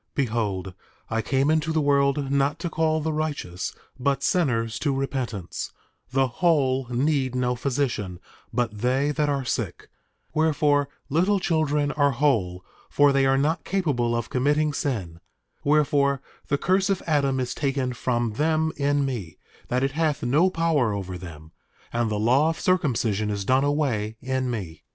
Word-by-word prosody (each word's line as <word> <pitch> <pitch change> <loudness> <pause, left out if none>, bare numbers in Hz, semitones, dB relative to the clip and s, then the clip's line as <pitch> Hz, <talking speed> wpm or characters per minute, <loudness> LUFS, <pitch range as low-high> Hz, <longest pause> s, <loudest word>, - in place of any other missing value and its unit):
Behold, 105 -8 -1 0.4
I 115 +1 +1
came 135 +6 +1
into 160 0 +1
the 160 - +1
world 140 -1 +2
not 140 +2 +2
to 170 +1 -4
call 160 0 +1
the 160 +1 -1
righteous 145 - -3 0.3
but 135 +1 0
sinners 115 -10 +1
to 140 -3 0
repentance; 130 -8 -3 0.4
the 135 +1 +2
whole 135 -2 +1
need 130 0 0
no 125 -1 +1
physician, 120 -8 -2 0.3
but 115 -2 -1
they 130 +6 +1
that 150 0 0
are 140 -2 -1
sick; - - -3 0.4
wherefore, 150 -2 +2 0.2
little 185 +7 +2
children 150 -4 +1
are 145 -2 +2
whole, 105 -10 0 0.2
for 145 0 +4
they 135 -1 +3
are 135 0 +3
not 155 +5 +1
capable 135 -11 0
of 120 -1 -3
committing 145 +3 +2
sin; 100 - -3 0.4
wherefore 145 -2 +3 0.3
the 140 - +1
curse 190 +5 +1
of 195 -2 0
Adam 140 -4 +1
is 125 -1 -2
taken 135 -3 -1
from 120 -2 -1
them 160 +4 +1
in 145 0 +1
me, 110 - -5 0.3
that 125 +1 0
it 135 - +1
hath 150 -2 0
no 150 +10 +3
power 160 - +1
over 95 -2 -5
them; 80 -3 -10 0.4
and 120 -1 +1
the 105 - -1
law 130 +9 +3
of 165 - -3
circumcision 115 - +1
is 100 -1 -3
done 130 +4 +3
away 125 -8 0
in 130 0 -2
me. 95 -9 -5
135 Hz, 160 wpm, -25 LUFS, 120-150 Hz, 0.4 s, for